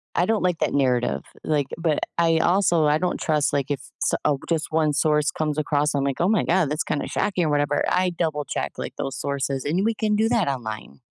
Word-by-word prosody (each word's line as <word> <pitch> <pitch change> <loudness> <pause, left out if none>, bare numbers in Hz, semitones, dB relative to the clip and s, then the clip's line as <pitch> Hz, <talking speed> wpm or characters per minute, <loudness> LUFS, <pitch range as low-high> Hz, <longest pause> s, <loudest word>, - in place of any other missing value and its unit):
I 175 - +3
don't 220 0 0
like 180 -3 +1
that - - 0
narrative. 125 -3 +1 0.2
Like 145 -3 0
but 165 -3 0 0.2
I 165 -1 +3
also 175 -2 +3
I 150 0 +3
don't 180 +2 -1
trust, 150 -2 +1
like, 140 -2 0
if 145 -2 -2 0.2
s - - +1
uh, 145 - +3
just 160 -2 0
1 155 -1 +2
source 150 +1 +2
comes 155 -1 -2
across, 150 0 +1
I'm 140 -1 0
like, 140 +1 -2
"Oh 175 - +3
my 220 - +2
god. 175 -3 +2
That's 150 +2 -1
kinda 145 - -2
shocking" 185 -4 0
or - - 0
whatever. 145 0 +1
I 180 0 +1
double 155 -4 -2
check, - - -3
like, - - -5
those 135 -2 -4
sources, 140 -1 -2
and 170 +7 0
we 225 +2 +2
can 215 -1 0
do 220 +2 +2
that 230 -7 +2
online. 110 - -5
155 Hz, 230 wpm, -23 LUFS, 145-175 Hz, 0.2 s, I